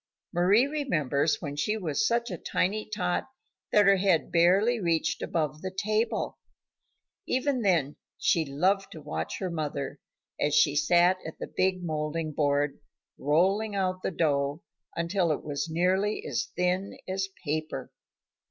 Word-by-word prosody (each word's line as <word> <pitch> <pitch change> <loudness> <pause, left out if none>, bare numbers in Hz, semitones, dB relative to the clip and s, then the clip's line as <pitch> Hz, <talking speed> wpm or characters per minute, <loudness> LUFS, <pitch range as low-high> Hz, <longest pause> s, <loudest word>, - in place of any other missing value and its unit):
Mari 190 +8 +4
remembers 165 - 0
when 145 -2 -4
she 210 +9 0
was 180 +1 0
such 235 -1 0
a 180 - -3
tiny 210 +4 -1
tot 180 -4 -1 0.5
that 210 -1 +5
her 195 0 +6
head 185 -4 +2
barely 195 +8 +4
reached 170 -4 0
above 155 -3 -2
the 190 - -3
table. 215 +4 -1 0.9
Even 260 0 0
then 170 -9 +1 0.2
she 165 - +2
loved 185 +8 0
to 160 - -9
watch 80 - -4
her 185 -2 -3
mother 145 -3 -3 0.4
as 145 0 +1
she 150 -1 +4
sat 175 +4 +4
at 160 - -8
the - - -5
big 185 -1 +1
moulding 155 0 -2
board, 145 -1 +1 0.4
rolling 195 +9 +2
out 185 -1 -1
the - - -1
dough 145 -3 0 0.3
until 170 0 +1
it 150 - -2
was 145 +1 -3
nearly 185 +5 +1
as - - -2
thin 180 +2 0
as 190 +1 -2 0.2
paper. 155 +1 -3
175 Hz, 145 wpm, -28 LUFS, 150-195 Hz, 0.9 s, her